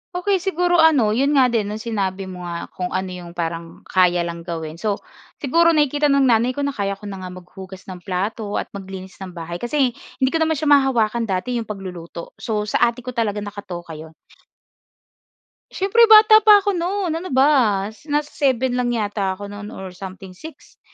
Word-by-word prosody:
Okey, 380 +2 +1
siguro 355 -2 +1
ano, 295 -10 +5
'yon 275 +6 +2
nga 255 -3 +4
din 220 -4 0
no'ng 215 +1 -5
sinabi 195 -4 -3
mo 180 -1 -7
nga 170 0 -6
kung 180 - -4
ano 185 0 -2
'yong 175 -1 -9
parang 165 -1 -5
kaya 180 -2 +2
lang 170 0 -5
gawin. 165 -1 -6
So 205 -1 -2 0.3
siguro 335 +4 +3
nakikita 295 0 +2
ng 280 -1 +3
nanay 245 0 +3
ko 285 - -2
na 280 - 0
kaya 200 -5 -2
ko 205 - -26
na 195 - -7
nga 185 - -6
maghugas 185 +1 -11
ng 180 - -8
plato 205 +3 -3
at - - -3
maglinis 190 -1 -9
ng 185 -2 -8
bahay 170 +1 -6
kasi 255 +1 +1
hindi 260 +2 -3
ko 325 - 0
naman 320 0 +2
siya 295 0 0
mahawakan 235 -5 +3
dati 225 +6 -1
'yong 225 - -6
pagluluto. 180 -5 -8
So 215 -2 -2
sa 225 +3 +2
ate 235 +1 -5
ko 250 - -5
talaga 210 -4 -1
nakatoka 185 -5 -8
'yon. 160 0 -11 1.6
Siyempre 455 +5 +4
bata 435 0 +8
pa 420 -2 +6
ako 405 - +1
no'n. 365 +1 -1
Ano 365 - -7
ba? 255 - +3 0.2
Nasa 295 0 -1
7 260 -3 +1
lang 250 - 0
yata 205 -3 -1
ako 200 +1 -8
no'n 205 0 -8
or 190 -3 -8
something, 190 +1 -9
6. 315 - -13
215 Hz, 190 wpm, -21 LUFS, 185-280 Hz, 1.6 s, bata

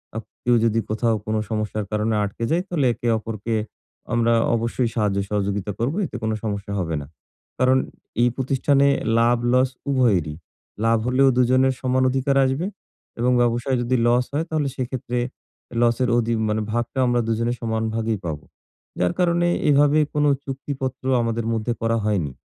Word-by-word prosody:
আ - - -2 0.3
কেউ 120 0 +3
যদি 115 0 +2
কোথাও 115 +1 +1
কোনো 110 0 0
সমস্যার 110 -1 -2
কারণে 105 +1 0
আটকে 100 +3 -4
যাই, 170 +2 +2
তাহলে 160 -7 0
একে 120 - -5
অপরকে 110 +1 -4 0.6
আমরা 115 0 +3 0.2
অবশ্যই 115 +1 -1
সাহায্য-সহযোগিতা 100 -1 -1
করব। 125 +6 0
এতে - - -8
কোনো 110 0 0
সমস্যা 100 -1 -3
হবে 85 -3 -2
না। 70 - -9 0.5
কারণ 130 +1 +4 0.4
এই 120 - +4
প্রতিষ্ঠানে 140 +2 +2 0.3
লাভ-লস 120 +2 +3 0.2
উভয়েরই। 100 - +2 0.5
লাভ 115 0 +4
হলেও 130 +2 +4
দুজনের 130 +1 +3
সমান 130 0 +1
অধিকার 135 +2 0
আসবে 135 +8 -1 0.5
এবং 125 +2 +2
ব্যবসায় 120 +2 +1
যদি 120 +2 0
লস 120 +1 +3
হয় 155 +3 0
তাহলে 155 -3 0
সেক্ষেত্রে 125 -2 -3 0.6
লসের 120 +1 +2
অধি 115 0 +1 0.2
মানে 110 +1 0
ভাগটা 120 +3 -2
আমরা 120 0 +2
দুজনের 115 +2 0
সমান 110 -1 -1
ভাগেই 115 -2 -1
পাবো। 75 -3 -4 0.5
যার 90 - +1
কারণে 175 -1 +2 0.2
এভাবে 145 +1 +4
কোনো 150 0 +3 0.2
চুক্তিপত্র 135 -1 -5 0.2
আমাদের 115 0 -1
মধ্যে 115 +1 -1
করা 115 0 +1
হয়নি। 90 -10 0
120 Hz, 150 wpm, -22 LUFS, 110-130 Hz, 0.6 s, কারণ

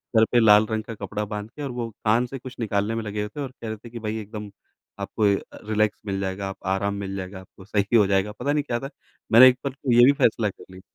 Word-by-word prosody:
Sir 110 - +6
पे 120 - +5
लाल 105 -1 +6
रंग 110 0 -1
का 115 - -7
कपड़ा 105 +1 -4
बांध 105 +1 -6
के 150 - -10
और 140 - -3
वो 120 -2 -4 0.2
कान 115 +3 +3
से 135 +2 -7
कुछ 130 +1 -10
निकालने 105 0 -1
में 115 - -2
लगे 105 0 -3
हुए 105 - -3
थे 145 - -4
और 135 -2 -4
कह 115 - -5
रहे 110 - -4
थे 115 +3 -13
कि 115 - -8
भाई 110 0 -3
एकदम 105 0 -8 0.5
आपको 110 - -3
अ, - - -9
रिलैक्स 105 0 +1
मिल 100 -2 -2
जाएगा, 95 0 -3
आप 95 - -8
आराम 95 +2 0
मिल 95 0 -5
जाएगा, 95 0 -6
आपको 95 0 -16
सही 105 +2 0
हो 105 -3 +5
जाएगा, 100 +1 +1
पता 140 +6 -2
नहीं 150 - +1
क्या 120 -4 -2
था। 135 - -6 0.4
मैंने 120 +3 +10
एक 125 -1 +4
बार 135 - -2
को 135 -1 -3
ये 120 +1 +8
भी 135 - +7
फ़ैसला 110 -2 +3
कर - - -13
लिया। 95 0 -12
110 Hz, 280 wpm, -24 LUFS, 100-120 Hz, 0.5 s, मैंने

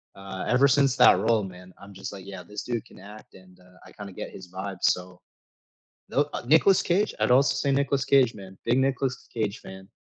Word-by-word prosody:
uh, 95 -1 -7
ever 130 +3 +4
since 140 -1 +3
that 90 - +6
role, 110 0 +2
man, 90 -1 -11
I'm 100 0 -13
just 95 - -7
like, 95 -2 -10
yeah, 95 -2 -8
this 105 0 -7
dude 120 -3 -4
can - - -17
act 105 +2 -13
and, 90 -1 -18
uh, 90 0 -21
I - - -15
kinda 100 -2 -10
get - - -7
his 90 -2 -12
vibe, 95 0 -6
so 90 0 0 0.9
No, 145 +1 0
uh, - - -4
Nicholas 160 +7 +4
Cage, 195 +5 0
I'd - - +2
also 135 +2 +4
say 140 - 0
Nicholas 140 -1 +1
Cage, 135 -4 +3
man, 95 -2 -12
big 120 +2 +2
Nicholas 130 -1 -1
Cage 110 0 -2
fan. 95 0 -12
105 Hz, 215 wpm, -26 LUFS, 95-135 Hz, 0.9 s, that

